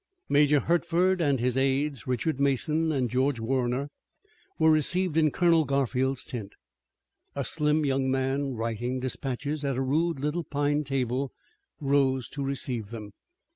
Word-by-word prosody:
Major 145 Hz, 0 st, +4 dB
Hertford 175 Hz, +2 st, +2 dB
and 140 Hz, -5 st, +2 dB
his 125 Hz, +1 st, 0 dB
aides, 135 Hz, -2 st, 0 dB
Richard 130 Hz, +4 st, -1 dB
Mason 150 Hz, +4 st, +1 dB
and 130 Hz, -4 st, 0 dB
George 130 Hz, +2 st, 0 dB
Warner, 130 Hz, +3 st, -1 dB, 0.7 s
were 160 Hz, -, +5 dB
received 165 Hz, +3 st, +2 dB
in 160 Hz, -1 st, +4 dB
Colonel 165 Hz, +1 st, +3 dB
Garfield's 135 Hz, -2 st, 0 dB
tent. 110 Hz, -5 st, -6 dB, 0.8 s
A 140 Hz, -2 st, -2 dB
slim 150 Hz, +4 st, +1 dB
young 135 Hz, -1 st, +1 dB
man, 135 Hz, +1 st, -1 dB
writing 115 Hz, +3 st, -2 dB
dispatches 135 Hz, +3 st, -3 dB
at 135 Hz, -3 st, -1 dB
a -, -, 0 dB
rude 155 Hz, +3 st, 0 dB
little 150 Hz, +5 st, -1 dB
pine 145 Hz, 0 st, 0 dB
table, 135 Hz, -1 st, -1 dB, 0.5 s
rose 135 Hz, -3 st, +1 dB
to 140 Hz, 0 st, -5 dB
receive 125 Hz, -5 st, -3 dB
them. 110 Hz, -3 st, -8 dB
135 Hz, 140 wpm, -27 LUFS, 130-150 Hz, 0.8 s, were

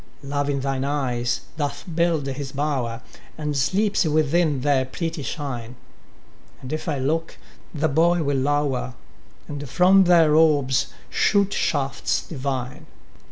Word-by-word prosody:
Love 145 Hz, +1 st, -2 dB
in 140 Hz, -1 st, -1 dB
thine 135 Hz, -1 st, -1 dB
eyes 125 Hz, -4 st, -1 dB, 0.2 s
doth 145 Hz, -2 st, -3 dB
build 165 Hz, -3 st, +1 dB
his 135 Hz, 0 st, -4 dB
bower, 135 Hz, -5 st, -2 dB, 0.3 s
And 150 Hz, -1 st, -3 dB
sleeps 200 Hz, +11 st, +2 dB
within 155 Hz, -2 st, +2 dB
their 140 Hz, -1 st, +2 dB
pretty 165 Hz, +4 st, -4 dB
shine; 130 Hz, -5 st, -5 dB, 0.8 s
And 130 Hz, +3 st, -7 dB
if 155 Hz, +2 st, -3 dB
I 145 Hz, -, -1 dB
look, 160 Hz, +5 st, -2 dB, 0.3 s
the 155 Hz, 0 st, 0 dB
boy 165 Hz, +3 st, +3 dB
will 140 Hz, -1 st, 0 dB
lower, 135 Hz, -2 st, 0 dB, 0.5 s
And 145 Hz, -2 st, -6 dB
from 190 Hz, +4 st, +5 dB
their 165 Hz, -4 st, +5 dB
orbs 145 Hz, -5 st, +3 dB, 0.2 s
shoot 200 Hz, -1 st, +2 dB
shafts 140 Hz, -3 st, -1 dB
divine. 130 Hz, -4 st, -4 dB
145 Hz, 130 wpm, -23 LUFS, 135-160 Hz, 0.8 s, from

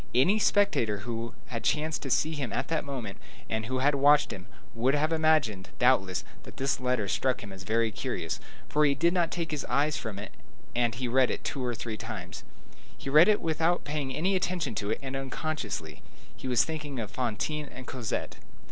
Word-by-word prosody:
Any 185 Hz, -, +5 dB
spectator 120 Hz, -, +2 dB
who 115 Hz, -1 st, -4 dB
had 115 Hz, -3 st, -4 dB
chanced 155 Hz, +4 st, +1 dB
to 135 Hz, -, -4 dB
see 155 Hz, +5 st, +2 dB
him 140 Hz, -5 st, -3 dB
at -, -, -2 dB
that 165 Hz, -1 st, 0 dB
moment, 125 Hz, -8 st, -5 dB, 0.3 s
and 110 Hz, 0 st, -2 dB
who 130 Hz, -, -1 dB
had 145 Hz, -, +5 dB
watched 145 Hz, +1 st, +5 dB
him, 95 Hz, -2 st, -9 dB, 0.3 s
would 125 Hz, +5 st, +2 dB
have 155 Hz, +2 st, +1 dB
imagined, 155 Hz, -12 st, +2 dB
doubtless, 110 Hz, -8 st, +3 dB, 0.2 s
that -, -, -13 dB
this 140 Hz, +1 st, 0 dB
letter 125 Hz, -5 st, 0 dB
struck 130 Hz, +6 st, 0 dB
him 100 Hz, -2 st, -8 dB
as 95 Hz, -, -9 dB
very 110 Hz, +3 st, +1 dB
curious, -, -, -3 dB, 0.3 s
for 150 Hz, -, +2 dB
he 140 Hz, -2 st, +4 dB
did 170 Hz, +5 st, +3 dB
not 175 Hz, -2 st, +2 dB
take 170 Hz, -2 st, -3 dB
his 150 Hz, -, -2 dB
eyes 145 Hz, +4 st, +1 dB
from 105 Hz, -3 st, -5 dB
it, 100 Hz, -, -7 dB, 0.4 s
and 120 Hz, -1 st, +2 dB
he 125 Hz, +1 st, -2 dB
read 130 Hz, +1 st, +4 dB
it -, -, -3 dB
two 135 Hz, -, -3 dB
or 120 Hz, -1 st, -1 dB
three 115 Hz, -1 st, -4 dB
times. 95 Hz, -5 st, -6 dB, 0.5 s
He 135 Hz, -, -5 dB
read 155 Hz, +4 st, +8 dB
it 210 Hz, -1 st, +4 dB
without 165 Hz, +2 st, +1 dB
paying 145 Hz, -2 st, -2 dB
any 190 Hz, +5 st, +1 dB
attention 180 Hz, -7 st, -1 dB
to 100 Hz, -1 st, -2 dB
it, 110 Hz, -, +1 dB
and 135 Hz, 0 st, -4 dB
unconsciously. 130 Hz, -, -4 dB, 0.3 s
He -, -, -7 dB
was 125 Hz, -2 st, +4 dB
thinking 150 Hz, -4 st, -5 dB
of 110 Hz, -3 st, -4 dB
Fantine 130 Hz, +6 st, -2 dB
and 130 Hz, 0 st, -9 dB
Cosette. 120 Hz, -4 st, -3 dB
130 Hz, 200 wpm, -29 LUFS, 115-155 Hz, 0.5 s, read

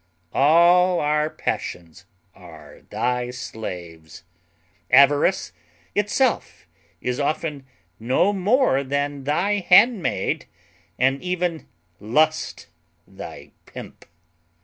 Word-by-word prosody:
All 175 Hz, +5 st, +4 dB
our 150 Hz, +1 st, +1 dB
passions 85 Hz, -, -5 dB, 0.3 s
are 80 Hz, -5 st, -15 dB
thy 125 Hz, 0 st, -1 dB
slaves. 90 Hz, -8 st, -8 dB, 0.7 s
Avarice 140 Hz, -, +4 dB, 0.4 s
itself 215 Hz, +5 st, 0 dB, 0.4 s
is 125 Hz, +1 st, -2 dB
often 145 Hz, -1 st, -3 dB, 0.3 s
no 130 Hz, -, +1 dB
more 200 Hz, -, +2 dB
than 140 Hz, 0 st, -3 dB
thy 195 Hz, +8 st, +1 dB
handmaid, 200 Hz, +2 st, +3 dB, 0.5 s
and 135 Hz, +2 st, +1 dB
even 180 Hz, -2 st, -3 dB, 0.3 s
Lust 155 Hz, +9 st, 0 dB, 0.4 s
thy 95 Hz, -, -11 dB, 0.2 s
pimp. -, -, -11 dB
145 Hz, 80 wpm, -22 LUFS, 120-180 Hz, 0.7 s, All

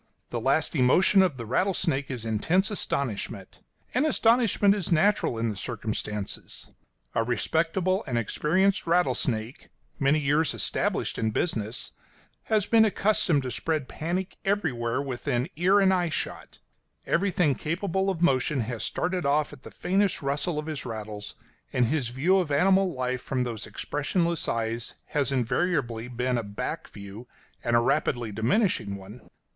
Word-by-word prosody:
The 120 Hz, -, -2 dB
last 140 Hz, +6 st, +1 dB
emotion 175 Hz, +9 st, +5 dB
of 175 Hz, -8 st, +1 dB
the 115 Hz, -, -6 dB
rattlesnake 145 Hz, -, 0 dB
is 125 Hz, -4 st, -5 dB
intense 165 Hz, -, +1 dB
astonishment; 140 Hz, -, -3 dB, 0.3 s
and 255 Hz, -, +2 dB
astonishment 230 Hz, -8 st, +4 dB
is 200 Hz, -5 st, -3 dB
natural, 185 Hz, -, +3 dB
in 115 Hz, 0 st, 0 dB
the 105 Hz, -, -4 dB
circumstances. 105 Hz, +2 st, -4 dB, 0.4 s
A 115 Hz, -, +2 dB
respectable 165 Hz, -, 0 dB
and 120 Hz, -3 st, -1 dB
experienced 185 Hz, -, +1 dB
rattlesnake, 135 Hz, -9 st, 0 dB, 0.3 s
many 140 Hz, +2 st, +3 dB
years 150 Hz, +2 st, +1 dB
established -, -, -1 dB
in 110 Hz, -, +1 dB
business, 110 Hz, -2 st, -1 dB, 0.5 s
has 215 Hz, -3 st, +2 dB
been 225 Hz, 0 st, +5 dB
accustomed 200 Hz, -8 st, +2 dB
to 130 Hz, -, -3 dB
spread 155 Hz, -2 st, -1 dB
panic 180 Hz, +4 st, -3 dB
everywhere 140 Hz, -, 0 dB
within 125 Hz, -1 st, -2 dB
ear 185 Hz, +4 st, +4 dB
and 190 Hz, -1 st, +4 dB
eye 175 Hz, -2 st, +1 dB
shot; 155 Hz, -, -4 dB, 0.5 s
everything 180 Hz, -5 st, +2 dB
capable 185 Hz, +6 st, -1 dB
of 175 Hz, -3 st, -2 dB
motion 135 Hz, -2 st, +2 dB
has 115 Hz, 0 st, -4 dB
started 180 Hz, 0 st, -1 dB
off 145 Hz, +1 st, +1 dB
at 140 Hz, -, -12 dB
the -, -, -10 dB
faintest 195 Hz, -2 st, 0 dB
rustle 145 Hz, +4 st, -1 dB
of 150 Hz, -, -3 dB
his 155 Hz, -3 st, -4 dB
rattles, 105 Hz, -1 st, -6 dB, 0.4 s
and 125 Hz, -2 st, +2 dB
his 125 Hz, -1 st, 0 dB
view 165 Hz, +10 st, +2 dB
of 175 Hz, -5 st, -1 dB
animal 190 Hz, +6 st, +3 dB
life 130 Hz, -3 st, -2 dB
from 130 Hz, -1 st, -1 dB
those 115 Hz, -2 st, -4 dB
expressionless 170 Hz, +3 st, -1 dB
eyes 115 Hz, +1 st, -2 dB
has 145 Hz, -3 st, +1 dB
invariably 125 Hz, -2 st, 0 dB
been 125 Hz, 0 st, -1 dB
a -, -, -3 dB
back 100 Hz, 0 st, -5 dB
view, 100 Hz, +4 st, -10 dB, 0.4 s
and 120 Hz, 0 st, +1 dB
a -, -, +6 dB
rapidly 120 Hz, -3 st, 0 dB
diminishing 110 Hz, -, +1 dB
one. 100 Hz, +5 st, -12 dB
145 Hz, 150 wpm, -27 LUFS, 120-180 Hz, 0.5 s, a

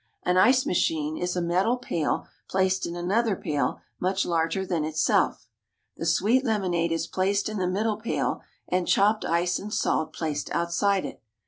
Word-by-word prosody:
An 180 Hz, -, +1 dB
ice 255 Hz, +8 st, +5 dB
machine 155 Hz, -3 st, 0 dB
is 180 Hz, +2 st, -2 dB
a 180 Hz, -, 0 dB
metal 185 Hz, +8 st, +1 dB
pail 170 Hz, -11 st, -2 dB, 0.2 s
placed 190 Hz, -1 st, +1 dB
in 170 Hz, -, -5 dB
another 200 Hz, +5 st, +1 dB
pail 150 Hz, -4 st, -2 dB, 0.2 s
much 190 Hz, +1 st, 0 dB
larger 170 Hz, +3 st, 0 dB
than 175 Hz, -4 st, -1 dB
itself. 155 Hz, +1 st, +1 dB, 0.5 s
The 165 Hz, -, -4 dB
"sweet 215 Hz, +10 st, +3 dB
lemonade" 185 Hz, -8 st, 0 dB
is 165 Hz, 0 st, 0 dB
placed 195 Hz, +3 st, 0 dB
in 215 Hz, -1 st, -3 dB
the 180 Hz, -, 0 dB
middle 210 Hz, +3 st, 0 dB
pail, 220 Hz, +2 st, -2 dB, 0.3 s
and 180 Hz, -1 st, 0 dB
chopped 210 Hz, +2 st, +3 dB
ice 175 Hz, +1 st, +1 dB
and 210 Hz, -, -7 dB
salt 155 Hz, -6 st, 0 dB
placed 155 Hz, -3 st, -3 dB
outside 180 Hz, +3 st, +1 dB
it. -, -, -8 dB
180 Hz, 165 wpm, -26 LUFS, 170-200 Hz, 0.5 s, ice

